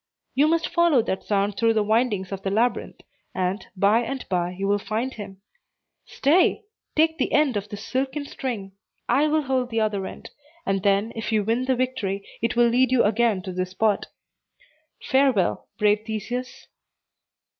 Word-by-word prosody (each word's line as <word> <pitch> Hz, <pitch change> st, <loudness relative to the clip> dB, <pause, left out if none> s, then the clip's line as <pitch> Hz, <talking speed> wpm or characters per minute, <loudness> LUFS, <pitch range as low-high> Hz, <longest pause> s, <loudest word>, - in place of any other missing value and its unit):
"You 285 Hz, +3 st, +4 dB
must 330 Hz, +1 st, +1 dB
follow 340 Hz, -8 st, +3 dB
that 190 Hz, -4 st, -3 dB
sound 200 Hz, 0 st, 0 dB
through 230 Hz, -1 st, +2 dB
the 215 Hz, -, +3 dB
windings 215 Hz, -3 st, 0 dB
of 195 Hz, -1 st, -4 dB
the 195 Hz, -, -2 dB
labyrinth, 230 Hz, +5 st, 0 dB, 0.3 s
and, 185 Hz, +2 st, -2 dB
by 200 Hz, +4 st, +4 dB
and 265 Hz, +3 st, -5 dB
by, 175 Hz, -2 st, 0 dB
you 190 Hz, +2 st, -4 dB
will 205 Hz, 0 st, +2 dB
find 220 Hz, +6 st, -3 dB
him. 195 Hz, -2 st, -10 dB, 0.6 s
Stay! 315 Hz, +10 st, +2 dB, 0.3 s
take 320 Hz, +1 st, +2 dB
the -, -, 0 dB
end 295 Hz, -5 st, +3 dB
of 205 Hz, 0 st, -3 dB
this 205 Hz, 0 st, -7 dB
silken 270 Hz, +2 st, -2 dB
string; 240 Hz, -10 st, -5 dB, 0.4 s
I 295 Hz, +3 st, +3 dB
will 310 Hz, 0 st, +1 dB
hold 260 Hz, -2 st, 0 dB
the 225 Hz, -1 st, 0 dB
other 205 Hz, -3 st, -1 dB
end; -, -, -10 dB, 0.3 s
and 195 Hz, -1 st, 0 dB
then, 200 Hz, +3 st, +1 dB
if 225 Hz, 0 st, -4 dB
you 215 Hz, -2 st, +2 dB
win 230 Hz, +4 st, 0 dB
the 260 Hz, 0 st, +2 dB
victory, 230 Hz, -6 st, -2 dB, 0.2 s
it 230 Hz, +1 st, 0 dB
will 240 Hz, 0 st, +5 dB
lead 255 Hz, +1 st, +3 dB
you 255 Hz, -2 st, +4 dB
again 215 Hz, -2 st, +2 dB
to 185 Hz, -, -5 dB
this 185 Hz, 0 st, -2 dB
spot. 205 Hz, +2 st, 0 dB, 1.0 s
Farewell, 265 Hz, -8 st, +2 dB
brave 210 Hz, -1 st, +3 dB
Theseus." 230 Hz, +3 st, -5 dB
225 Hz, 175 wpm, -24 LUFS, 200-260 Hz, 1.0 s, will